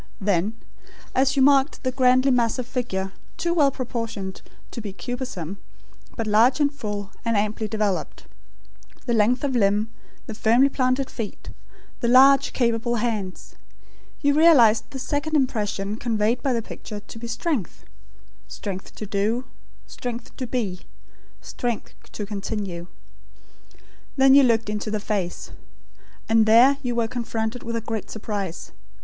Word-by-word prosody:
Then 200 +1 0 0.6
as 270 +1 +2
you 270 - +4
marked 275 +1 +3
the 255 - 0
grandly 255 +1 +4
massive 245 0 +1
figure, 210 -7 -3 0.3
too 340 0 0
well 295 -5 +4
proportioned 230 -7 -5 0.3
to 235 - -6
be 205 -3 -6
cumbersome, 205 - -5 0.6
but 225 - -1
large 220 +7 +4
and 290 -1 +2
full, 205 -7 -5
and 230 -2 +1
amply 215 +1 -1
developed; 210 -3 -2 0.8
the 240 - 0
length 235 +4 +2
of 275 -3 0
limb; 210 0 +2 0.3
the - - -6
firmly 235 +5 +4
planted 260 0 0
feet; 225 -4 -6 0.5
the 235 - -1
large 270 +3 +6
capable 235 -1 0
hands, 215 -5 -3 0.7
you 285 -2 +3
realised 280 -9 +5
the 270 - -7
second 290 +4 -2
impression 210 -6 0
conveyed 225 0 0
by 275 - 0
the 230 -2 0
picture, 210 -1 -8
to 225 - -11
be 235 - -6
strength; 230 - -3 0.6
strength 185 - -7
to 215 - -6
do; 210 +5 0 0.4
strength 240 -1 -7
to 255 - -4
be; 215 -7 -2 0.6
strength 240 -3 -4 0.2
to 210 - -5
continue. 200 -4 -4 1.3
Then 270 0 +6
you 280 - +8
looked 230 -4 +3
into 210 +1 -3
the 215 0 -1
face. 195 -4 -3 0.8
And 225 -1 +4
there 245 +5 +6
you 245 -3 -2
were 230 -1 +1
confronted 230 0 -3
with 230 0 -4
a 230 - -1
great 225 -2 -4
surprise. 200 -5 -5
230 Hz, 145 wpm, -24 LUFS, 210-255 Hz, 1.3 s, you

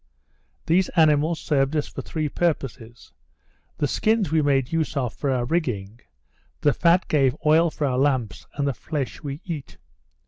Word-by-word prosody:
These 180 +3 +2
animals 155 0 +3
served 140 0 0
us 150 - 0
for - - -7
three 155 -2 -3
purposes; 135 -8 -3 0.6
the 145 - +1
skins 215 0 +1
we 160 -1 +3
made 135 -3 +1
use 160 -2 -1
of 125 -5 -1
for 140 - -3
our 125 -2 0
rigging; 120 - -2 0.6
the 145 - +3
fat 170 +2 +3
gave 135 -4 +2
oil 160 +2 +5
for 155 - -3
our 130 -2 0
lamps; 130 -7 0
and 140 -1 -1
the 140 - 0
flesh 135 -4 -4
we 145 +2 -6
eat. 155 -8 -6
145 Hz, 165 wpm, -24 LUFS, 130-160 Hz, 0.6 s, oil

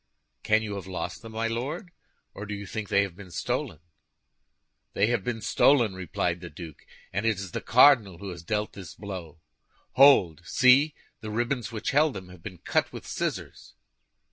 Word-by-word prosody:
"Can 110 +1 +2
you 105 -2 -4
have 95 - -8
lost 90 -1 -5
them, 115 -1 -10
my 115 +1 -1
Lord, 130 - -4 0.4
or 100 - -8
do 105 - -4
you 100 0 -7
think 105 +2 -5
they 100 - +4
have 95 -4 -6
been 95 -1 -12
stolen?" 80 -2 -3 1.2
"They 100 - +3
have 115 -3 0
been 115 0 -3
stolen," 120 -6 +3
replied 90 -1 -2
the 90 - -8
duke, 80 -1 -11 0.3
"and 100 +4 -1
it 115 -1 +2
is 95 -2 -7
the - - -4
cardinal 115 -7 +5
who 100 +2 -7
has 85 -1 -8
dealt 105 +5 -2
this 95 -2 -10
blow. 95 -6 -8 0.5
Hold; 110 - +5
see! 130 - +4 0.2
The 110 -1 -7
ribbons 120 +3 -2
which 110 -2 -3
held 150 -1 +3
them 95 -2 -8
have 90 -2 -14
been 90 -1 -8
cut - - 0
with - - -9
scissors." - - -5
105 Hz, 185 wpm, -27 LUFS, 90-115 Hz, 1.2 s, cardinal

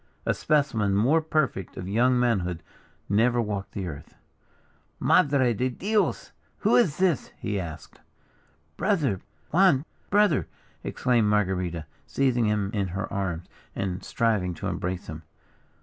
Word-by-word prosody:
A - - +2
specimen 120 -10 +1
more 135 +11 +3
perfect 155 - -1
of 90 - -5
young 125 +5 +3
manhood 90 -9 0 0.4
never 115 +4 +3
walked 105 -3 -3
the 95 - -3
earth. 70 -4 -9 0.8
"Madre 135 -4 +3
de 125 +4 0
Dios, 205 - -1 0.3
who - - +4
is 205 - +3
this?" 180 -6 +1
he 105 -2 -2
asked. 80 -3 -8 0.8
"Brother! 155 - +1 0.3
Juan! 165 -5 +4 0.2
brother!" 205 -7 +3 0.4
exclaimed 120 -4 +1
Marguerita, 90 -5 0 0.2
seizing 125 -4 +1
him 105 -2 0
in 100 -3 0
her 95 +3 -4
arms, 95 -4 -2 0.3
and 95 -2 -3
striving 105 -7 0
to - - -7
embrace 90 0 -3
him. 80 0 -7
105 Hz, 130 wpm, -26 LUFS, 95-135 Hz, 0.8 s, who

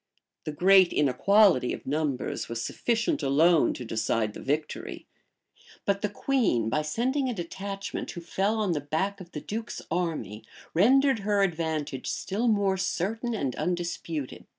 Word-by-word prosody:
The 155 - -2
great 185 +3 +5
inequality 150 +1 +4
of - - -8
numbers 145 -2 -2
was 115 0 -3
sufficient 235 - 0
alone 155 +4 +4
to 125 - -7
decide 110 -1 -1
the - - -9
victory; 150 +2 -3 0.8
but 200 0 +1
the 210 - 0
queen, 205 - +1
by 150 +6 +1
sending 255 - 0
a 245 - -3
detachment, 195 +2 -5
who 175 - -6
fell 195 +5 0
on 210 -4 0
the 150 -3 -1
back 185 +8 -2
of 175 -1 -12
the 150 - -6
duke's 225 +2 -5
army, 155 - -2 0.3
rendered 265 - +4
her 205 0 +2
advantage 160 -6 -2
still 215 +5 -2
more 200 -3 +2
certain 220 +6 -2
and 135 - -2
undisputed. 170 -5 -3
175 Hz, 150 wpm, -27 LUFS, 150-205 Hz, 0.8 s, great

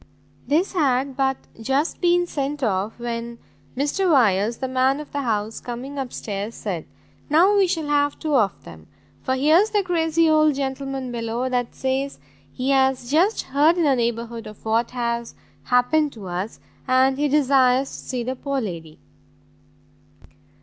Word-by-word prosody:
This 320 +9 +1
had 270 -5 +1
but 265 0 +1 0.2
just 270 +7 -1
been 350 0 +3
sent 290 -3 -3
off, 200 -1 -1
when 235 0 -5 0.4
Mr 335 +7 +1
Wyers, 225 -4 +3
the 260 - -3
man 260 +2 +1
of 300 - -9
the 285 - -2
house, 220 -3 -2
coming 255 +4 -6
up 260 -2 -4
stairs, 205 +2 -5
said, 180 -7 -5 0.4
"Now 350 +7 +5
we 395 -2 +4
shall 330 -4 -1
have 290 -1 +1
two 310 -2 -3
of 215 -6 +1
them, - - -13 0.3
for 260 - -1
here's 315 +10 +4
the 415 -2 +1
crazy 330 -2 +2
old 310 -2 +4
gentleman 270 -1 -3
below, 235 +2 -2
that 245 -2 -2
says 265 +1 -2 0.3
he 255 - -2
has 265 -2 +2
just 360 +9 +2
heard 295 +6 +3
in 345 - +2
the 280 -3 +3
neighbourhood 235 -1 -3
of 215 0 -13
what 225 +2 +1
has 235 -1 -3 0.3
happened 275 +4 +2
to 205 -4 -9
us, 180 +5 -4 0.3
and 260 +1 +3
he 295 - +2
desires 270 -2 +3
to - - -8
see 250 -2 -4
the 255 +2 -3
poor 275 +1 -2
lady." 165 -8 -6
265 Hz, 165 wpm, -23 LUFS, 235-295 Hz, 0.4 s, Now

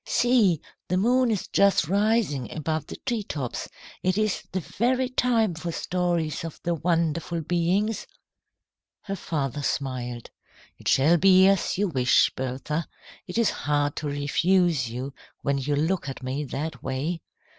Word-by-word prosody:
See! 225 - +3 0.3
The 180 - +1
moon 245 +5 +3
is 210 -4 -1
just 200 -5 +3
rising 200 - +1
above 155 0 -2
the - - -7
tree 240 -4 0
tops. 140 - -4 0.3
It 185 +1 +1
is 215 -2 +1
the 190 - -1
very 250 +8 0
time 235 -6 +2
for 165 +1 -4
stories 170 -4 -1
of 165 -2 -7
the 170 - 0
wonderful 170 0 0
beings." 180 +7 0 1.0
Her 195 - -3
father 145 -6 -3
smiled. 125 -4 -3 0.5
"It - - -8
shall 155 +6 +5
be 185 +1 +6
as 195 -2 +2
you 205 +1 +2
wish, 130 -6 +3
Bertha. 135 +5 -3 0.4
It 180 - -5
is 230 -2 +3
hard 145 0 0
to 150 - -3
refuse 145 0 +2
you 130 +4 -5 0.3
when 140 0 +1
you 145 +2 -1
look 160 +1 0
at 135 - -7
me 135 +3 -2
that 140 -1 -4
way. 150 +6 -2
165 Hz, 150 wpm, -26 LUFS, 145-195 Hz, 1.0 s, be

